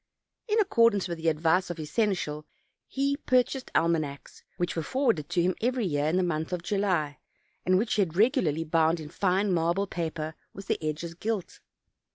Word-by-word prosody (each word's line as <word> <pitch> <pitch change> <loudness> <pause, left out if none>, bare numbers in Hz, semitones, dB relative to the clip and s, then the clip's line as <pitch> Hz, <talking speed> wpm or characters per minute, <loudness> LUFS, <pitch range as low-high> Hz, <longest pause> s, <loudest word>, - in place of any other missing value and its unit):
In 435 0 +2
accordance 230 - +3
with 170 -2 -5
the 165 - -2
advice 160 +4 +2
of 175 - -4
his 155 -2 -7
seneschal 180 -9 -1 0.4
he 280 +1 0
purchased 255 0 +1
almanacs, 155 -4 -1 0.2
which 175 - -1
were 165 - -1
for 265 - -2
warded 170 - +1
to 175 - +1
him 185 +1 +2
every 245 0 +1
year 145 -4 0
in 165 +4 +1
the 185 - +2
month 160 -2 -2
of 180 -2 -3
July, 175 -6 0 0.5
and 185 0 +5
which 215 +4 0
he 210 - +2
had 170 -4 -1
regularly 200 - +2
bound 165 +1 +2
in 155 -1 -8
fine 190 +3 +1
marble 170 +4 +1
paper 160 -4 -4 0.2
with 195 - -8
the - - -2
edges 155 +2 -3
gilt. 205 +2 -4
175 Hz, 190 wpm, -28 LUFS, 160-205 Hz, 0.5 s, and